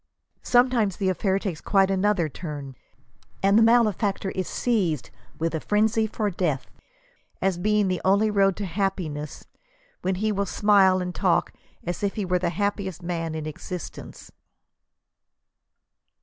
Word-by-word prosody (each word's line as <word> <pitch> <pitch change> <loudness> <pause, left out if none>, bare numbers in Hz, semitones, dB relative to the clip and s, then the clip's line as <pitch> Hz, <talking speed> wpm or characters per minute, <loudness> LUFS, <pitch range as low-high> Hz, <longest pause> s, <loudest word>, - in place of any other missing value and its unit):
Some 245 +1 +4
times 215 -7 +1
the 195 -2 0
affair 190 +1 +1
takes 190 -6 -4
quite 195 -1 +3
another 195 -3 +2
turn, 145 -3 -7 0.7
and 200 +1 +4
the 225 - +6
malefactor 215 -4 +2
is 185 - -3
seized 175 - -1 0.3
with 165 +1 -1
a 160 - -1
frenzy 220 +4 +1
for 210 -1 -2
death, 165 -7 -2 0.7
as 185 -2 0
being 210 +1 +2
the 185 -1 -1
only 200 +3 +3
road 195 -2 +3
to 205 - -4
hap 195 +2 -1
piness, 150 -4 -6 0.6
when 185 +1 0
he 215 +3 0
will 200 -1 -1
smile 190 -2 +4
and 180 0 -4
talk 185 -2 +1 0.3
as 175 0 -4
if 200 -1 -1
he 210 -3 -2
were 180 0 +1
the 175 -1 0
happiest 190 0 -2
man 165 -2 -3
in. 155 -1 -4
existence." 160 +3 -8
190 Hz, 150 wpm, -25 LUFS, 175-210 Hz, 0.7 s, the